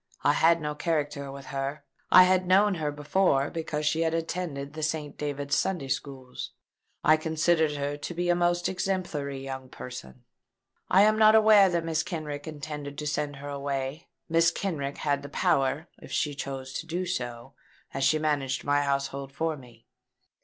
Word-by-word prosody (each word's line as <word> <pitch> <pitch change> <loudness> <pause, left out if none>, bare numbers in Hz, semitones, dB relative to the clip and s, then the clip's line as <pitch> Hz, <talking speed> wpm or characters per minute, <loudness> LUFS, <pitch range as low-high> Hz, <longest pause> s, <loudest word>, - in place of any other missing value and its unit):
I 145 - +4
had 165 +2 +4
no 150 0 -2
character 150 -3 -2
with 135 0 -9
her. 140 +2 -3 0.3
I 185 - +10
had 185 0 +2
known 200 +3 +5
her 155 -4 -2
before, 145 -1 +1
because 155 -2 -3
she 160 +2 +1
had 165 0 +1
attended 160 -4 -3
the 155 - -6
St. 155 -1 -2
David's 145 -1 -2
Sunday 170 -8 -1
Schools. 130 -2 -5 0.5
I 155 +1 +6
considered 160 0 +1
her 145 0 -3
to 150 - -6
be 175 +1 -1
a 175 - +4
most 175 0 +1
exemplary 180 -7 -2
young 130 -1 -6
person. 95 - -9 0.7
I 200 +3 +6
was 215 - -2
not 215 0 +7
aware 215 -3 +7
that 170 -2 0
Mrs. 160 -1 0
Kenrick 155 -5 -5
intended 145 -2 -6
to 150 - -4
send 145 -1 -2
her 145 +1 -8
away. 140 +1 -3 0.2
Mrs. 165 0 +4
Kenrick 145 -8 -3
had 145 -1 0
the 140 - -8
power, 140 +2 +1
if - - -12
she 150 - 0
chose 135 -1 -6
to 165 - -8
do 175 +2 -2
so, 120 -6 -4 0.4
as 135 - -2
she 145 +3 +4
managed 145 -3 -1
my 145 0 +2
household 140 -1 -2
for 160 +3 -1
me. 120 -4 -16
150 Hz, 175 wpm, -28 LUFS, 140-165 Hz, 0.7 s, I